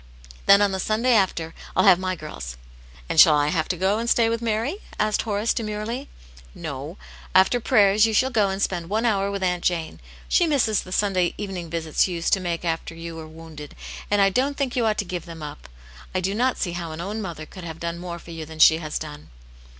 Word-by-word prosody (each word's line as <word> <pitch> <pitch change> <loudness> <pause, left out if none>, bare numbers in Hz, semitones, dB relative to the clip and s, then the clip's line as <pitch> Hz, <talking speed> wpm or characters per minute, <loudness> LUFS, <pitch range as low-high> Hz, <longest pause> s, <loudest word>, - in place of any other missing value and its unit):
Then 200 +1 +7
on 200 - +2
the 190 - -2
Sunday 225 +6 +1
after 175 -6 +1 0.2
I'll 185 - +4
have 185 -3 +7
my 185 0 -2
girls." 70 - -8 0.5
"And - - +1
shall 150 - +9
I 145 0 +2
have 160 -2 0
to 180 - -2
go 190 +4 +1
and 235 +1 -2
stay 230 -2 +4
with 230 0 -1
Mary?" 230 - -1 0.2
asked 215 0 +1
Horace, 215 0 0
demurely. 225 +5 -4 0.2
" 60 0 -22
" - - -23
No. - - -6 0.4
After 190 +6 +5
prayers 210 -1 +4
you - - -1
shall 255 +5 +2
go 210 -5 +2
and 190 0 -3
spend 175 -4 -1
one 220 +3 0
hour 200 -3 +1
with^ 200 -1 -3
Aunt 180 -1 0
Jane. 170 -3 -1 0.3
She 350 - +3
misses 240 -9 +2
the 185 - -12
Sunday 185 -3 +1
evening 190 -5 -5
visits 160 0 +1
you 180 - -4
used 170 0 0
to 195 - +4
make 175 -2 -3
her 170 - 0
after 165 0 -3
you 165 0 -7
wel*e 160 -1 -8
wounded, 155 -2 -11 0.3
and 205 -1 +4
I 195 - +4
don't 275 +7 0
think 270 -4 -1
you 235 -3 +2
ought 215 - +1
to 205 - -1
give 175 -2 -5
them 165 -1 -9
iip. 145 - -8 0.5
I - - +2
do 190 +2 -1
not 250 +4 +1
see 175 - -2
how 170 -2 -5
an 155 - -8
own 205 +5 -4
mother 170 -6 -6
could, 185 +3 -11
have 165 -1 -7
done 170 0 -4
more 175 -1 -6
for 170 - -12
you 165 -1 -6
than 160 +1 -10
she 160 +1 +7
has 155 -2 -4
done." 150 -1 -8
185 Hz, 240 wpm, -24 LUFS, 165-215 Hz, 0.5 s, shall